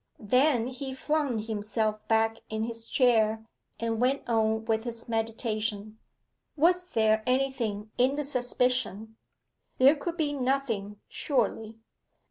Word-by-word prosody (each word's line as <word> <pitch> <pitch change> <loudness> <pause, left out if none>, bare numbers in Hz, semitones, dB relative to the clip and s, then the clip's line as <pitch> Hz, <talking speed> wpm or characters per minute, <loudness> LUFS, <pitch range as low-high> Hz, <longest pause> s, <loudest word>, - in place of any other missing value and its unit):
Then 250 +3 +3
he 260 +1 -5
flung 295 -3 0
himself 215 0 -2
back 225 0 +2
in 220 0 -2
his 230 0 -5
chair, 220 -3 +2 0.3
and 230 0 -1
went 265 +3 +1
on 220 -1 +1
with 225 -1 0
his 230 -1 -7
meditation. 220 -2 -3 0.6
Was 355 +4 +3
there 220 -8 +2
anything 245 -5 -1
in 260 +3 +3
the 295 - -2
suspicion? 250 -4 -1 0.6
There 270 +4 +6
could 335 +3 -5
be 300 -3 0
nothing, 250 -7 -1
surely. 225 -4 -1
230 Hz, 120 wpm, -28 LUFS, 220-265 Hz, 0.6 s, There